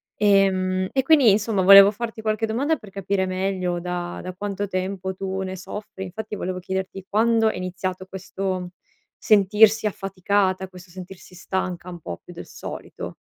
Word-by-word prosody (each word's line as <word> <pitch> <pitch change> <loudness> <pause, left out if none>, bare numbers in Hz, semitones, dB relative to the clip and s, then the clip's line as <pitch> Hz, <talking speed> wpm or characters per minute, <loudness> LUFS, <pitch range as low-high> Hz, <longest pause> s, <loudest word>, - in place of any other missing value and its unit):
E 195 -2 +4
mhmm, 185 0 -1
e 265 -1 +1
quindi 280 -6 +6
insomma 205 -1 +1
volevo 195 +2 +9
farti 225 0 -6
qualche 215 0 0
domanda 280 +8 0
per 210 - -13
capire 195 0 -1
meglio 185 -1 -1
da 175 0 -4
da 185 0 -6
quanto 205 +1 -4
tempo 190 0 -3
tu 190 0 -4
ne 190 0 -5
soffri, 190 +1 -8
infatti 210 +3 -6
volevo 185 -1 -4
chiederti 190 +1 -4
quando 225 +1 +3
è - - -4
iniziato 185 0 -4
questo 185 -1 -4 0.5
sentirsi 210 +1 +4
affaticata, 195 -1 -1
questo 180 -1 -14
sentirsi 185 0 -11
stanca 180 -1 -4
un 175 -1 -8
po' 85 -9 -6
più - - -12
del - - -9
solito. - - -8
190 Hz, 165 wpm, -23 LUFS, 185-205 Hz, 0.5 s, volevo